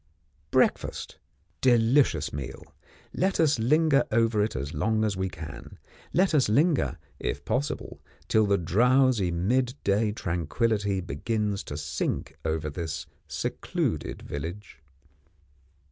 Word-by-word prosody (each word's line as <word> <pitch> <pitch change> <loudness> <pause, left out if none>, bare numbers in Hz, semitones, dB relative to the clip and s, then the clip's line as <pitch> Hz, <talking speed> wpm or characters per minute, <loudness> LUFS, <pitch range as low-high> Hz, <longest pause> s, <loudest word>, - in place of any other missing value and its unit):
Breakfast. - - 0 0.4
Delicious 120 - +3
meal, 70 -2 -7 0.4
let 190 +2 0
us 155 -5 +3
linger 150 +4 +4
over 115 -1 +3
it 110 - -2
as 70 +4 -4
long 110 +8 +1
as 105 -2 0
we 95 0 -1
can, 80 -4 -9 0.3
let 185 0 +3
us 135 -7 +3
linger, 145 +7 +2 0.2
if 70 +4 -3
possible, 145 +3 -2 0.3
till 110 0 +3
the 100 0 +3
drowsy 120 +3 +3
mid 120 +9 +1
day 105 +2 +2
tranquillity 100 +3 -1
begins 100 +6 -2
to 75 - -5
sink 70 -1 -3
over 80 -1 -1
this 80 +1 -4 0.2
secluded - - -2
village. 80 +2 -6
105 Hz, 115 wpm, -27 LUFS, 85-125 Hz, 0.4 s, linger